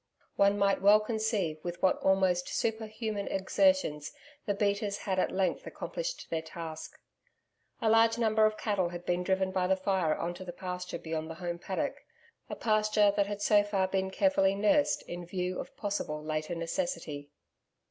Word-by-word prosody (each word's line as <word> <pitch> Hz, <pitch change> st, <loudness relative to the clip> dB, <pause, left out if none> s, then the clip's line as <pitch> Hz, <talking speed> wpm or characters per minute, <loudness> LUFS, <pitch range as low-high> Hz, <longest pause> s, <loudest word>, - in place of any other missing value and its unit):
One 200 Hz, 0 st, +4 dB
might 200 Hz, -1 st, +2 dB
well 205 Hz, +2 st, +7 dB
conceive 215 Hz, -7 st, -1 dB
with 175 Hz, 0 st, -5 dB
what 185 Hz, -, +4 dB
almost 190 Hz, -2 st, +2 dB
superhuman 220 Hz, -2 st, -2 dB
exertions 195 Hz, -, +1 dB, 0.4 s
the 205 Hz, -, +1 dB
beaters 200 Hz, 0 st, 0 dB
had 190 Hz, -2 st, -2 dB
at -, -, +2 dB
length 190 Hz, -1 st, -1 dB
accomplished -, -, -5 dB
their 165 Hz, -1 st, 0 dB
task. 160 Hz, -1 st, -8 dB, 0.8 s
A -, -, +2 dB
large 225 Hz, +1 st, +5 dB
number 220 Hz, -2 st, +4 dB
of 215 Hz, 0 st, -3 dB
cattle 200 Hz, -5 st, 0 dB
had 175 Hz, 0 st, -8 dB
been 175 Hz, 0 st, 0 dB
driven 190 Hz, +1 st, 0 dB
by 185 Hz, -1 st, 0 dB
the 190 Hz, -, +3 dB
fire 190 Hz, -4 st, +1 dB
on 175 Hz, -, -3 dB
to 180 Hz, -, -9 dB
the 175 Hz, -1 st, -7 dB
pasture 180 Hz, 0 st, -5 dB
beyond 160 Hz, 0 st, -4 dB
the 160 Hz, -, -6 dB
home 175 Hz, -1 st, -4 dB
paddock 190 Hz, +2 st, -3 dB, 0.5 s
a -, -, -4 dB
pasture 215 Hz, -2 st, +3 dB
that 200 Hz, -1 st, +2 dB
had 205 Hz, 0 st, -4 dB
so 205 Hz, -1 st, +5 dB
far 200 Hz, -2 st, 0 dB
been 190 Hz, 0 st, -1 dB
carefully 195 Hz, -4 st, +2 dB
nursed 215 Hz, +9 st, +2 dB
in 175 Hz, 0 st, -7 dB
view 180 Hz, +1 st, -3 dB
of -, -, -8 dB
possible 175 Hz, -7 st, -3 dB
later 155 Hz, +2 st, -3 dB
necessity. 165 Hz, -, -3 dB
190 Hz, 170 wpm, -30 LUFS, 175-215 Hz, 0.8 s, well